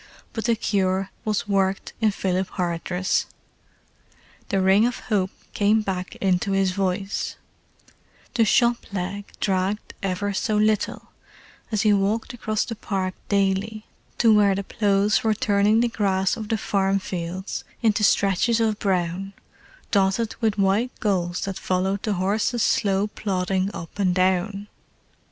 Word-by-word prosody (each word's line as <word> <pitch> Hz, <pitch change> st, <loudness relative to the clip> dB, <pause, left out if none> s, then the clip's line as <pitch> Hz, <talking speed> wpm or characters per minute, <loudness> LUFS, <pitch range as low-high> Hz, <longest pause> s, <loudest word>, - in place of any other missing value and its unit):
But 225 Hz, -, -4 dB
the 235 Hz, -1 st, +3 dB
cure 195 Hz, -2 st, 0 dB
was 215 Hz, -2 st, -1 dB
worked 195 Hz, -1 st, 0 dB
in 220 Hz, -, +4 dB
Philip 190 Hz, -2 st, -1 dB
Hardress. 180 Hz, +1 st, -1 dB, 1.2 s
The 195 Hz, -, +1 dB
ring 190 Hz, +4 st, +4 dB
of 245 Hz, -, -3 dB
hope 195 Hz, -4 st, 0 dB, 0.2 s
came 210 Hz, +2 st, +3 dB
back 185 Hz, -2 st, -4 dB
into 190 Hz, 0 st, 0 dB
his 195 Hz, -1 st, +2 dB
voice: 195 Hz, +1 st, -2 dB, 1.0 s
the 235 Hz, -, +3 dB
"shop 235 Hz, +1 st, +2 dB
leg" 195 Hz, +1 st, -4 dB
dragged 195 Hz, +2 st, -1 dB
ever 195 Hz, +1 st, -1 dB
so 210 Hz, +2 st, 0 dB
little, 215 Hz, 0 st, 0 dB, 0.6 s
as 215 Hz, 0 st, +1 dB
he 210 Hz, -1 st, +5 dB
walked 205 Hz, +5 st, 0 dB
across 215 Hz, -3 st, -1 dB
the 230 Hz, -, -5 dB
park 190 Hz, -3 st, -2 dB, 0.2 s
daily 200 Hz, +2 st, 0 dB, 0.3 s
to 225 Hz, -2 st, +5 dB
where 205 Hz, -2 st, +4 dB
the 200 Hz, -, -2 dB
ploughs 205 Hz, 0 st, +1 dB
were 220 Hz, -1 st, +2 dB
turning 210 Hz, -1 st, +3 dB
the 240 Hz, -, +3 dB
grass 195 Hz, -4 st, +1 dB
of 215 Hz, -1 st, -7 dB
the 225 Hz, -, +1 dB
farm 195 Hz, -1 st, +1 dB
fields 185 Hz, 0 st, -4 dB, 0.2 s
into 215 Hz, -1 st, +2 dB
stretches 200 Hz, +4 st, +3 dB
of 220 Hz, -2 st, +1 dB
brown, 185 Hz, 0 st, -1 dB, 0.6 s
dotted 200 Hz, +3 st, +2 dB
with 220 Hz, -2 st, +1 dB
white 200 Hz, +5 st, +1 dB
gulls 180 Hz, -5 st, 0 dB
that 195 Hz, -1 st, -4 dB
followed 190 Hz, +2 st, 0 dB
the 215 Hz, -, -1 dB
horses' 210 Hz, +5 st, 0 dB
slow 195 Hz, 0 st, +2 dB
plodding 190 Hz, -2 st, -1 dB
up 170 Hz, +2 st, -9 dB
and 185 Hz, -3 st, +2 dB
down. 190 Hz, +2 st, +1 dB
200 Hz, 140 wpm, -24 LUFS, 190-215 Hz, 1.2 s, he